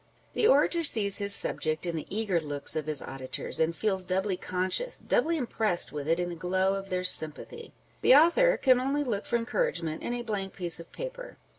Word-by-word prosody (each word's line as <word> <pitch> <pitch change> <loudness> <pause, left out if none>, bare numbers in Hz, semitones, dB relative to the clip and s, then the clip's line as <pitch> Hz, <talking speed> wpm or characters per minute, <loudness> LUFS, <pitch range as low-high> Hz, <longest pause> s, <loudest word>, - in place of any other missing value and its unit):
The 435 - +2
orator 300 +4 +3
sees 215 -10 +2
his 200 0 +6
subject 155 +2 0
in 170 -1 -3
the 155 - -6
eager 200 -4 -1
looks 145 -2 -1
of 155 -1 -3
his 150 -3 0
auditors; 130 -1 -4
and 160 +1 +1
feels 190 -2 -1
doubly 190 +1 -1
conscious, 185 - -2
doubly 335 -10 0
impressed 220 - 0
with 145 -1 -5
it 165 +2 +1
in 175 0 -2
the 175 - -6
glow 185 +3 0
of 195 0 -6
their 185 0 -2
sympathy; 185 - 0 0.3
the - - +6
author 425 - +4
can 255 -2 +3
only 275 +3 -1
look 215 -7 -3
for - - -1
encouragement 235 - -2
in 240 - -3
a 240 - -5
blank 200 -4 -4
piece 175 -3 -1
of 170 - -12
paper. - - -8
195 Hz, 200 wpm, -28 LUFS, 170-265 Hz, 0.3 s, his